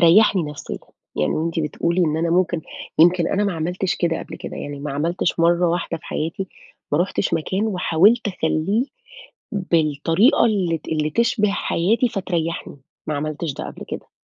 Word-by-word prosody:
ريحني 185 +2 +6
نفسيًا، 150 -1 -6 0.4
يعني 75 - +1
وأنتِ 165 +1 -1
بتقولي 170 +4 0
إن 155 0 0
أنا 165 +1 0
ممكن 175 -2 +1 0.4
يمكن 175 +1 +5
أنا 205 +1 +1
ما 200 - 0
عملتش 180 +3 -1
كده 170 -2 0
قبل - - -8
كده، - - -7
يعني 145 -1 -6
ما 145 -1 -4
عملتش 165 +3 0
مرّة 170 +1 +4
واحدة 170 0 -1
في 170 - -22
حياتي، 165 +5 -3 0.4
ما 150 - +3
رُحتش 185 +2 0
مكان 190 +7 -1
وحاولت 205 +4 +3
أخليه 185 +6 0 0.7
بالطريقة 165 - +3
اللي 185 -7 +1
ت - - -15
اللي 155 -1 0
تشبه 210 +2 +2
حياتي 215 +5 +1
فتريحني، 170 -8 -3 0.3
ما 155 - -1
عملتش 155 0 -3
ده - - -6
قبل - - -8
كده. - - -7
170 Hz, 165 wpm, -22 LUFS, 160-195 Hz, 0.7 s, ريحني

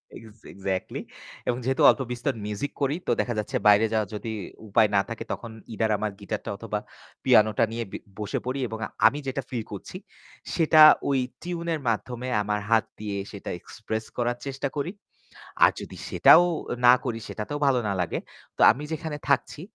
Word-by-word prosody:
X 110 -1 -13
exactly 95 -1 -3 0.5
এবং 120 - +1
যেহেতু 135 +1 0
অল্প - - +3
বিস্তর 125 +3 -1
মিউজিক 105 +7 -3
করি, 140 +2 +1
তো - - +2
দেখা 120 - -2
যাচ্ছে 105 - -2
বাইরে 105 +2 +6
যাওয়ার 110 -3 0
যদি 110 +2 -5 0.4
উপায় 105 +1 +4
না 100 - +5
থাকে 115 - -5
তখন 115 - -5 0.2
ইদার 110 0 0
আমার 105 +1 -2
গিটারটা 105 +1 -5
অথবা 105 -1 -3 0.4
পিয়ানোটা 110 -3 +4
নিয়ে 115 +1 -3
বি - - -4 0.2
বসে 105 -1 -2
পড়ি 130 +2 -2
এবং 110 0 -6 0.3
আমি 145 - 0
যেটা 135 +1 -2
ফিল 120 -3 -3
করছি - - -7 0.6
সেটা 155 -1 +5 0.3
ওই 135 - +2 0.2
টিউন 170 -1 -5
এর 155 - -2
মাধ্যমে 125 +2 -3
আমার 105 0 -1
হাত 115 -1 +4
দিয়ে 105 -2 -4
সেটা 100 - -8
এক্সপ্রেস 110 +3 -5
করার 120 0 0
চেষ্টা 140 0 -3
করি। 145 +5 -2 0.7
আর - - +8
যদি - - -9
সেটাও 175 - +7 0.4
না 120 - +9
করি 115 -3 -2
সেটাতেও 145 +7 -5
ভালো 130 -3 +3
না 100 - 0
লাগে। 85 - -2 0.4
তো - - -2
আমি 145 - -6
যেখানে 155 -1 -4
থাকছি, 140 +1 +1
115 Hz, 175 wpm, -26 LUFS, 105-135 Hz, 0.7 s, না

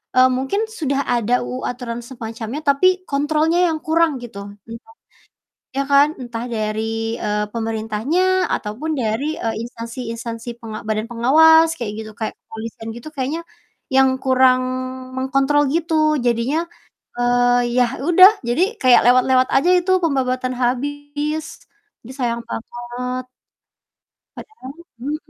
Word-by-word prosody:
eee, 255 0 +7
mungkin 265 +10 -1
sudah 290 -11 -2
ada 245 0 +1
UU 255 +1 -5
aturan 240 -1 -4
semacamnya 230 +1 -6
tapi 285 +3 +3 0.2
kontrolnya 305 +4 +1
yang 315 - -3
kurang 325 +1 +2
gitu. 220 -4 -9 0.3
Entah 230 - -11 0.8
Ya 275 +1 -2
kan? 280 +1 +5
Entah 240 -1 -5
dari, 225 +1 -2
eee, 210 -1 -1
pemerintahnya, 225 - 0
ataupun 245 +10 -3
dari, 265 +4 -2
eee, 225 -1 -2
instansi-instansi 230 0 -7
penga 220 -3 -7
badan 215 +1 -1
pengawas 320 +7 +5
kayak 215 -3 -3
gitu 220 0 -7
kayak, 220 +1 -5
kepolisian 225 0 -8
gitu 240 +6 -9
kayaknya, 275 +5 -2 0.5
yang 265 0 +4
kurang 260 -1 +4 0.6
mengkontrol 275 +2 +2
gitu. 310 -3 +1
Jadinya, 245 +8 0 0.5
eee, 245 0 +2
ya 250 - +5 0.2
udah, 350 +8 +7 0.2
jadi 245 +10 +2 0.2
kayak 255 -2 +5
lewat-lewat 255 0 +3
aja 280 +6 +3
itu 360 +1 -1
pembabatan 255 -4 0
habis. 290 +5 -3 0.4
duh 240 - -10
sayang 235 -2 -1
banget. 245 +2 -5 1.1
Padahal 275 -12 -10 0.3
mhm. 290 +5 -2
255 Hz, 125 wpm, -20 LUFS, 230-290 Hz, 1.1 s, eee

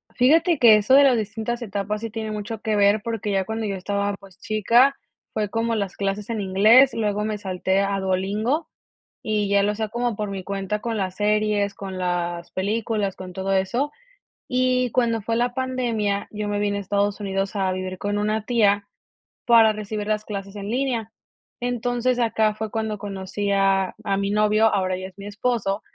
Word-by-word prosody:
Fíjate 320 +5 +4
que 230 -3 +8
eso 210 +5 +2
de 280 +1 +8
las 255 -4 +5
distintas 225 +3 -3
etapas, 205 0 -3
sí 230 - -4
tiene 220 0 -5
mucho 210 +1 -5
que 215 -1 0
ver. 205 +1 +4
Porque 225 -3 -3
ya 190 -1 +1
cuando, 220 +1 -3
yo 200 - -2
estaba, 200 +2 -2
pues, 195 -2 -17
chica, 235 +7 +3 0.4
fue 210 -2 -1
como 230 +1 -1
las 200 -3 -3
clases 200 +1 -3
en 225 -2 -2
inglés, 215 +8 +5
y - - -6
luego 210 -1 0
me 215 -1 -2
salté 190 -1 -1
a 200 0 0
Duolingo. 200 - -1 0.6
Y 210 -2 0
ya 200 0 +3
lo 205 - +1
hacia, 215 +1 -3
como 240 0 -2
por 210 -1 -3
mi 190 -1 -5
cuenta, 200 +2 -3
con 230 -2 -3
las 190 -2 -3
series, 210 -1 +1
con 190 -1 -7
las 175 -1 -2
películas, 210 0 -1
con 185 -1 -8
todo 190 +2 -2
eso. 235 +10 0 0.6
Y, 255 -1 +1
cuando 230 -3 +1
fue 230 +2 -2
la 245 +1 0
pandemia, 240 -6 -1
yo 210 0 -4
me 205 0 -1
vine 205 -1 0
a - - -3
Estados 200 +1 0
Unidos, 195 0 -2
a 190 -2 +1
vivir 185 0 -4
con 205 +2 -2
una 215 +1 -1
tía, 205 -4 +2 0.6
para 230 -2 +6
recibir 210 0 -5
las 215 0 0
clases 200 -1 -6
en 200 0 -6
línea. 240 -3 -1 0.5
Entonces, 245 0 -1
acá 220 -2 +2
fue 220 0 -4
cuando 220 -1 -2
conocí 200 0 -4
a 195 -1 +2
a 195 -1 0
mi 200 0 -1
novio, 215 +1 +3
ahora 185 -2 0
ya 185 0 -6
es 190 - -17
mi 200 - -9
esposo. 205 -1 -1
210 Hz, 195 wpm, -23 LUFS, 195-225 Hz, 0.6 s, que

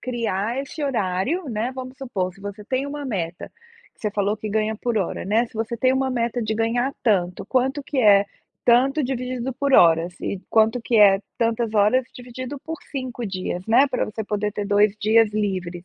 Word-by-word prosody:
criar 230 -1 -2
esse 280 +3 -7
horário, 245 - -1
né, 230 +2 -2
vamos 255 0 -7
supor, 195 -9 -3
se 195 - -19
você 205 +1 -7
tem 260 +5 -1
uma 290 0 -5
meta, 175 -9 -4 0.5
que - - -29
você 210 - -1
falou 205 +1 0
que 215 - -6
ganha 215 +1 0
por 235 +1 -2
hora, 190 - -3
né, 220 +5 +2
se - - -24
você 225 +2 -3
tem 255 +2 +3
uma 265 0 0
meta 240 -1 -1
de 220 0 -1
ganhar 235 +4 0
tanto, 180 -6 +1
quanto 265 +4 0
que 280 - -3
é 205 -4 +6 0.4
tanto 265 +5 +4
dividido 255 0 -3
por 280 +2 -1
horas? 170 -1 +5
E 195 - -3
quanto 225 +2 +3
que 230 0 0
é 200 -2 +6 0.2
tantas 230 -1 0
horas 215 +5 +3
dividido 250 +3 -7
por 325 +1 -7
5 255 -4 -4
dias, 185 -1 -4
né? 240 +6 +5
Pra 255 - -1
você 220 +1 -5
poder 210 0 -2
ter 205 - -3
2 205 0 +3
dias 220 0 +4
livres, 185 -4 -3
225 Hz, 195 wpm, -23 LUFS, 205-255 Hz, 0.5 s, é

